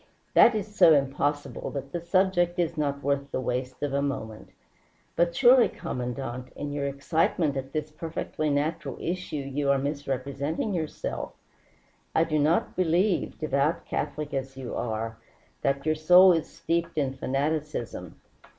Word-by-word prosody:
"That 235 - +7
is 210 0 -3
so 160 -5 +7
impossible 145 +1 -1
that 140 -1 -6
the 170 - -3
subject 175 0 +2
is 170 -1 0
not 140 -2 -2
worth 140 0 0
the - - -2
waste 125 +1 -3
of 145 -2 -1
a 140 - +1
moment. 120 -6 -4 0.7
But 170 0 +2
surely, 250 +1 +6
Commandante, 125 0 -5
in 145 0 -4
your 145 -1 -2
excitement 150 +1 0
at 135 0 -4
this 155 0 -3
perfectly 155 -1 -3
natural 145 +3 -1
issue 180 -1 -3
you 140 0 -2
are 140 - +4
misrepresenting 140 - -2
yourself. 160 -4 -4 0.8
I 160 - +5
do 155 -2 0
not 155 +4 +2
believe, 180 +1 +1
devout 150 +2 0
Catholic 150 0 -3
as 135 -1 -4
you 130 -2 -6
are, 110 0 -3 0.4
that 140 +1 0
your 155 - +3
soul 180 +4 +7
is 165 -2 -1
steeped 170 -1 -2
in 135 -3 0
fanaticism. 135 - -3
145 Hz, 150 wpm, -27 LUFS, 135-165 Hz, 0.8 s, That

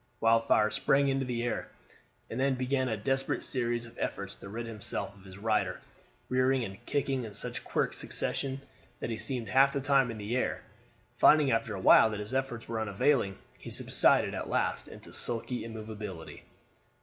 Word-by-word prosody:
Wildfire 115 -1 +3
sprang 140 +5 +2
into 135 0 0
the 120 -1 -2
air, 120 - -2 0.6
and 115 - -5
then 135 0 +2
began 130 0 0
a 110 - -1
desperate 135 +6 -1
series 120 -3 -1
of 115 - -14
efforts - - -3
to 100 - -10
rid 115 +3 -5
himself 105 -3 -4
of 100 - -18
his 95 -1 -12
rider, 110 +1 0 0.5
rearing 130 0 +2
and 95 -3 -8
kicking 135 -2 0
in 105 -3 -8
such - - -2
quick - - -1
succession 135 0 0 0.4
that - - -4
he 115 - -3
seemed 125 -5 -2
half 135 +5 +4
the 140 - 0
time 135 -2 +3
in 115 - -5
the 105 +3 -3
air. 130 - -1 0.5
Finding 150 -3 +5
after 115 -2 0
awhile 95 +3 +6
that 105 -1 -4
his 105 +4 -5
efforts 130 -4 -2
were 115 -1 -3
unavailing, 100 0 +1 0.2
he - - -9
subsided - - +3
at - - -4
last - - 0
into - - -11
sulky 120 +1 -1
immovability. 110 -6 -7
120 Hz, 175 wpm, -30 LUFS, 110-135 Hz, 0.6 s, awhile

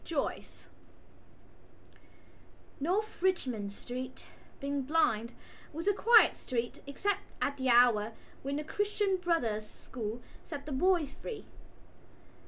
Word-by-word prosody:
ARABY 295 -4 0 2.4
North 380 +9 -1
Richmond 250 - 0
Street, 255 +5 -7 0.3
being 280 0 -1
blind, 250 -6 +2 0.4
was 330 +5 -5
a 410 - +5
quiet 455 +3 +6
street 240 -2 -3
except 395 +8 0 0.2
at 280 - 0
the 260 -1 0
hour 235 -3 +5 0.3
when 275 +1 -2
the 300 - -2
Christian 405 +2 0
Brothers' 235 -13 0
School 235 -1 -6 0.2
set 285 -3 -7
the 300 - -6
boys 325 0 +2
free. 440 +6 -7
280 Hz, 110 wpm, -32 LUFS, 245-365 Hz, 2.4 s, quiet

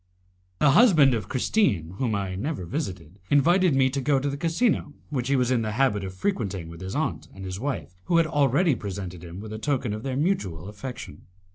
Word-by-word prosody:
The 150 - +4
husband 155 - +6
of 110 -6 -3
Christine, 110 - +1
whom 120 -5 0
I 100 -2 -2
never 115 - -3
visited, 95 - -5
invited 170 +3 +4
me 135 -1 +4
to 140 0 -2
go 145 +1 +2
to 140 +1 -1
the - - -3
casino 165 - 0 0.2
which 125 -4 -1
he 140 - +2
was 125 -1 +2
in 125 -2 +2
the 110 -1 -2
habit 110 -5 +1
of 95 -1 -6
frequenting 95 - -2
with 85 +1 -10
his 95 +1 -5
aunt - - -2
and 95 - -8
his 95 +1 -5
wife, 135 -7 -3
who 170 - +2
had 165 - +5
already 145 +2 +3
presented 95 -6 -6
him 85 +1 -8
with 110 +1 -7
a 110 - -5
token 130 -4 -1
of 105 - -5
their 130 +1 -3
mutual 100 - -1
affection. 105 - -8
125 Hz, 215 wpm, -26 LUFS, 95-145 Hz, 0.2 s, husband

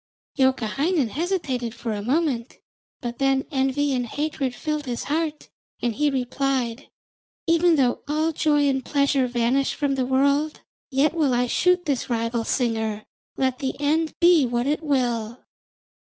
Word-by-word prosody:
Youkahainen 265 - +1
hesitated 270 - -2
for 230 -2 -4
a 205 - -3
moment, 260 0 -1 0.4
but 240 -1 -5
then 270 0 +2
envy 270 +1 +1
and 245 -2 -1
hatred 285 -1 -2
filled 300 -2 -3
his 240 -1 -3
heart, 310 +1 -2 0.3
and 240 -1 -1
he 295 +5 +1
replied: 260 -2 -2 0.6
'Even 335 0 +4
though 255 -4 +1
all 310 +2 +1
joy 295 -2 +2
and 265 -1 0
pleasure 280 -1 +1
vanish 245 +3 +1
from 285 -2 0
the 260 -2 0
world, 280 +3 +1 0.3
yet 280 +2 +2
will 295 -7 +2
I 245 +1 +2
shoot 360 +8 +2
this 280 -5 -1
rival 230 0 -1
singer, 220 -4 -1 0.3
let 260 -1 0
the 265 -1 -2
end 310 +2 +1
be 340 -3 +6
what 240 0 -1
it 295 +3 0
will.' 240 -6 -1
270 Hz, 150 wpm, -24 LUFS, 245-300 Hz, 0.6 s, be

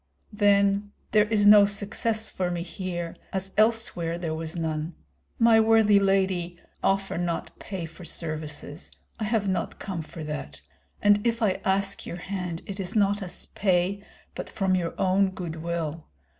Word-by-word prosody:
"Then 200 0 +3 0.2
there 210 -1 +5
is 210 -2 +3
no 205 -1 +9
success 215 +2 -1
for 180 -1 -1
me 175 -1 -2
here, 175 -1 -5 0.2
as 190 0 -3
elsewhere 215 -7 +2
there 165 -2 -3
was 160 +1 -4
none. 160 0 -3 0.4
My 230 -1 +6
worthy 220 -2 +5
lady, 190 -3 +1 0.3
offer 195 -2 +1
not 175 -1 -3
pay 190 -4 -5
for 165 +2 -12
services, 155 -1 -4 0.3
I 220 - -1
have 215 -2 0
not 190 -1 -1
come 185 -5 -4
for 160 +1 -9
that; 150 -2 -6 0.4
and 205 0 +5
if 230 0 0
I 195 -3 +1
ask 195 +1 0
your 175 - -5
hand 180 -2 -5
it 200 0 -7
is 195 +4 -3
not 205 0 +2
as 180 -2 -5
pay, 190 +1 +1 0.3
but - - -6
from 190 -2 0
your 175 -2 -1
own 190 +1 +3
good 175 -4 -6
will. 165 -1 -4
190 Hz, 160 wpm, -26 LUFS, 170-205 Hz, 0.4 s, no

